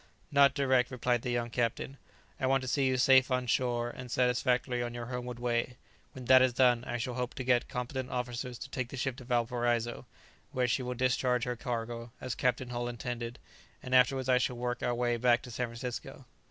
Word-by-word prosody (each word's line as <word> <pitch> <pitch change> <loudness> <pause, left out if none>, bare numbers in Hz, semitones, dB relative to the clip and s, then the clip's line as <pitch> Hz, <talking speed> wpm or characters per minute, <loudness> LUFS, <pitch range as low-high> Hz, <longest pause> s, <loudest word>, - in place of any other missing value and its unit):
"Not 140 -1 +5
direct," 130 -3 +2
replied 125 -2 0
the 125 - -4
young 120 -1 -1
captain; 120 +3 -2 0.4
"I 130 - +1
want 135 0 +2
to - - -5
see 135 +1 +2
you 130 0 +1
safe 130 +1 +5
on 125 -1 0
shore 120 0 0
and 125 0 -9
satisfactorily 125 0 +1
on 120 0 -4
your 120 -1 -5
homeward 125 0 -5
way. 120 0 -1 0.4
When 130 -1 -9
that 130 +1 +7
is 130 -1 +3
done, 125 -1 +4
I 120 - -3
shall 125 +1 -3
hope 125 0 -3
to 130 - -4
get 125 -1 +2
competent 125 +1 -4
officers 125 0 -4
to 135 - -8
take 130 -2 -3
the 135 - -7
ship 130 0 -1
to 130 - -9
Valparaiso, 120 -1 0 0.5
where 125 -1 +1
she 125 - +1
will 125 0 -3
discharge 125 -1 +1
her 125 0 -2
cargo, 115 -1 -4
as 130 - -4
Captain 125 0 -1
Hull 120 0 -2
intended; 120 0 -5 0.5
and 130 - -5
afterwards 130 0 +4
I 125 -1 +4
shall 125 -1 -1
work 120 0 -2
our 120 - 0
way 120 0 0
back 120 0 +3
to 125 - -9
San 125 +1 -2
Francisco." 120 +1 -7
125 Hz, 210 wpm, -31 LUFS, 120-130 Hz, 0.5 s, that